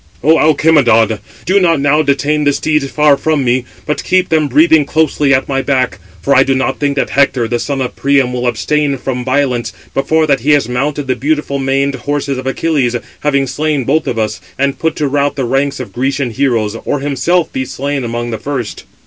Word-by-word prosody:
"O 160 +3 +4
Alcimedon, 135 -9 +3 0.3
do 195 +3 +3
not 165 -5 +2
now 145 +2 +3
detain 150 +1 0
the 145 -1 +2
steeds 150 -2 0
far 150 -1 +3
from 155 0 0
me; 125 +1 +1 0.2
but 150 - -2
[keep 185 0 +1
them] 155 -2 +2
breathing 155 +3 +4
closely 150 -1 +1
at 135 -1 +2
my 135 -1 0
back; 130 -2 0 0.2
for 140 - +2
I 130 - +6
do 135 0 +2
not 130 0 -1
think 145 -1 0
that 140 - -1
Hector, 135 -4 +2
the 120 +1 -1
son 140 +2 -3
of 125 - -3
Priam, 135 -2 +1
will 125 0 -2
abstain 140 +5 0
from 125 -1 -4
violence, 130 -2 0 0.2
before 155 +4 +1
that 140 -3 +2
he 145 +6 +2
has 145 -5 +2
mounted 140 +4 -2
the 130 -1 0
beautiful 150 -1 -1
maned 135 +1 0
horses 140 0 -3
of 130 - -6
Achilles, 135 -3 0 0.2
having 140 -2 +1
slain 145 +1 -1
both 150 +6 0
of 120 - -2
us, 110 -3 -2 0.2
and 140 0 -1
put 160 -1 -1
to 150 - -1
rout 140 +1 0
the 135 -2 -2
ranks 135 +3 -1
of 130 - -7
Grecian 135 0 -1
heroes; 115 -4 0
or 145 - -2
himself 145 +5 0
be 130 - -1
slain 135 +1 -3
among 120 0 -3
the 110 - -4
first." 130 -6 -5
140 Hz, 210 wpm, -14 LUFS, 130-150 Hz, 0.3 s, I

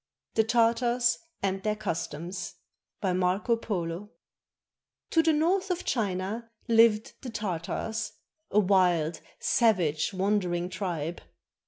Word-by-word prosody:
THE 220 - +4
TARTARS 240 +1 +2 0.2
AND 195 0 0
THEIR 215 +1 0
CUSTOMS 175 -3 -4 0.5
BY 190 -3 +1
MARCO 185 +6 +2
POLO 190 -3 -3 1.0
To 325 - +5
the 325 0 +3
north 360 +6 +2
of 360 -1 -2
China 210 +1 -1 0.2
lived 225 -1 +4
the 255 - -6
Tartars, 210 +1 -3 0.4
a 210 - +4
wild, 180 -5 +3 0.2
savage, 180 -10 +2
wandering 185 -3 0
tribe. 175 -4 -3
205 Hz, 110 wpm, -28 LUFS, 180-230 Hz, 1.0 s, To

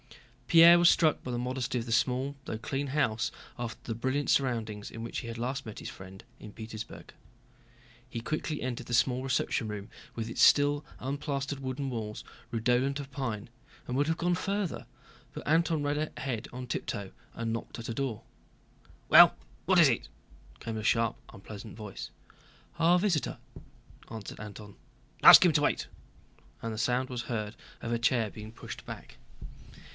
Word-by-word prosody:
Pierre 170 +1 +8
was 175 0 +7
struck 155 -3 +3
by 125 - -4
the 120 - -2
modesty 125 0 -2
of 115 - -2
the 115 - -6
small 130 +4 +1
though 110 - -4
clean 135 +4 -3
house 120 -5 0 0.3
after 120 -2 -5
the 115 - -4
brilliant 130 +5 -1
surroundings 110 -6 0
in 115 - -7
which 115 - -4
he - - -7
had 115 0 -6
last 130 +3 -3
met 110 - -8
his - - -6
friend 95 0 -11
in 105 - -10
Petersburg. 110 0 -8 1.0
He 115 - -4
quickly 155 +4 -3
entered 125 -2 -4
the 120 - -4
small 125 +2 +2
reception 125 -3 0
room 105 0 -6 0.3
with 115 -1 -3
its 115 - -2
still 145 0 +5 0.2
unplastered 140 0 -3
wooden 135 +1 -3
walls 110 -4 -5 0.3
redolent 125 +4 +1
of 140 -1 -7
pine, 115 -6 -4 0.4
and 125 - -2
would 145 +2 +2
have 160 0 0
gone 175 +1 +1
farther, 195 -1 -2 0.5
but - - -7
Antón 160 -1 +2
ran 150 +2 0
ahead 125 -5 -3
on 125 +1 -7
tiptoe 100 -4 -4 0.2
and 115 -1 -3
knocked 115 - -5
at 115 - -6
a 115 - -3
door. 125 -3 -3 0.8
"Well, - - +9 0.3
what - - +5
is - - +8
it?" - - 0 0.5
came 115 - -5
a 110 - -4
sharp, 115 0 +2 0.2
unpleasant 105 +1 -10
voice. 105 -3 -7 0.7
"A 170 +2 +5
visitor," 175 -6 0 0.7
answered 110 -3 -8
Antón. 105 -1 -9 0.5
"Ask - - +11
him - - +5
to - - +3
wait," - - +1 0.7
and 115 -1 -3
the - - -6
sound 125 +2 +1
was 125 -2 -3
heard 110 -3 -4 0.3
of 120 - -3
a 115 - 0
chair 115 -2 +2
being 110 +2 -9
pushed - - -9
back. - - -9
125 Hz, 170 wpm, -30 LUFS, 115-140 Hz, 1.0 s, Ask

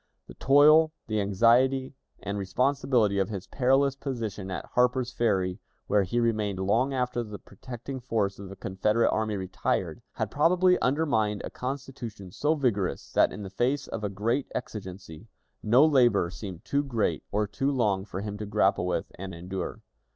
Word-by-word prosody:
The - - -12
toil, 150 - +5
the 110 -2 -1
anxiety, 120 +7 +3 0.3
and 100 0 -3
responsibility 120 0 +1
of 95 - 0
his 100 -4 -5
perilous 135 +1 +2
position 110 -8 -5
at 95 - -4
Harper's 125 0 +2
Ferry, 95 -6 0 0.3
where 105 - +3
he 100 +6 -1
remained 110 -4 0
long 110 +8 +1
after 125 -2 -1
the 105 -3 -7
protecting 125 +6 -8
force 110 -6 -1
of 100 -1 -8
the 100 - -9
Confederate 105 +4 +1
army 110 -1 -1
retired, 95 -1 -2
had - - -3
probably 180 +4 +3
undermined 120 -8 +1
a - - -7
constitution 125 -7 -6
so 150 - +1
vigorous 115 - -1
that, - - +4
in 105 - -7
the 95 - -8
face 130 +7 0
of 110 - -5
a 105 - -1
great 115 +7 -1
exigency, 95 -4 -7 0.3
no 120 +7 +5
labor 125 - +3
seemed 95 -3 -8
too 140 - +1
great 120 -6 -1
or 105 +1 +1
too 135 +7 -1
long 105 -8 +1
for 95 -1 -6
him 105 0 -5
to 105 - -5
grapple 100 -3 +2
with 90 - -2
and 95 -1 -6
endure. 90 +2 -5
110 Hz, 165 wpm, -27 LUFS, 100-130 Hz, 0.3 s, toil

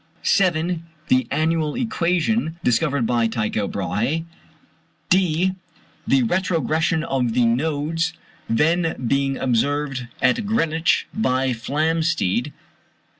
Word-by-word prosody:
(c) 195 -2 +4 0.6
The 130 0 +3
annual 155 +1 0
equation, 180 -5 0
discovered 135 0 +1
by 115 -1 +2
Tycho 110 -2 -1
Brahé. 105 - -2 0.9
(d) 180 0 +3 0.6
The 135 -1 +3
retrogression 165 0 0
of 130 -7 -1
the 120 - +4
nodes, 155 +6 0 0.4
then 160 +7 +2
being 135 +2 +1
observed 135 +1 0
at 130 - +1
Greenwich 165 -5 +1
by 130 -10 +1
Flamsteed. 150 - 0
150 Hz, 95 wpm, -22 LUFS, 125-165 Hz, 0.9 s, c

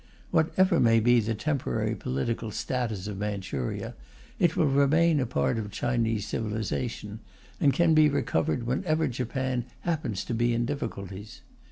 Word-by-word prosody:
Whatever 175 +2 +3
may 115 -1 +5
be 120 +2 +4
the 110 0 -1
temporary 135 - -1
political 110 - -2
status 110 -3 -3
of 100 -2 -5
Manchuria, 100 -11 -3 0.5
it 170 -2 +2
will - - +4
remain 150 +3 +3
a 130 - 0
part 120 -1 0
of 105 -2 -4
Chinese 115 -1 -1
civilization, 110 0 -3 0.4
and 145 - +4
can 170 +2 +3
be 155 -1 +6
recovered 80 - 0
whenever 155 +6 0
Japan 130 0 -2 0.2
happens 150 - -2
to - - -3
be 120 +1 +1
in 120 +1 0
difficulties. 105 -7 -6
120 Hz, 145 wpm, -27 LUFS, 105-145 Hz, 0.5 s, be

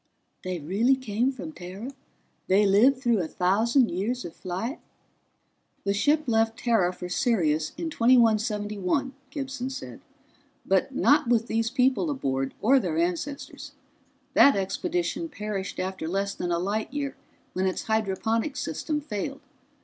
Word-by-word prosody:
"They 185 -1 -3
really 200 - +2
came 250 0 0
from 270 +4 -7
Terra? 195 +3 -8 0.6
They 200 +3 +4
lived 220 +8 +5
through 240 -4 +1
a 165 - -2
thousand 225 - +2
years 225 +8 -2
of 170 - -8
flight?" 190 - -4 1.0
"The 200 - +1
ship 295 +9 +2
left 225 -1 +1
Terra 220 -7 +2
for 180 0 -7
Sirius 170 - +1
in 325 -1 -3
2171," 220 -1 +2 0.2
Gibson 270 -2 -4
said. 265 - -8 0.6
"But - - +1
not 295 -2 +4
with 230 -1 +3
these 225 -1 0
people 260 +5 +2
aboard, 135 - -2
or 265 +5 +6
their 170 -9 -2
ancestors. 280 - -3 0.6
That 280 -1 +7
expedition 335 - -2
perished 210 -6 -4
after 185 -3 -3
less 195 +3 -1
than 175 - -3
a 170 - +2
light 205 +7 -2
year 285 -1 -3 0.4
when 190 +1 0
its 185 - -2
hydroponics 220 +4 0
system 300 -2 -2
failed. 275 +1 -4
225 Hz, 140 wpm, -26 LUFS, 190-265 Hz, 1.0 s, That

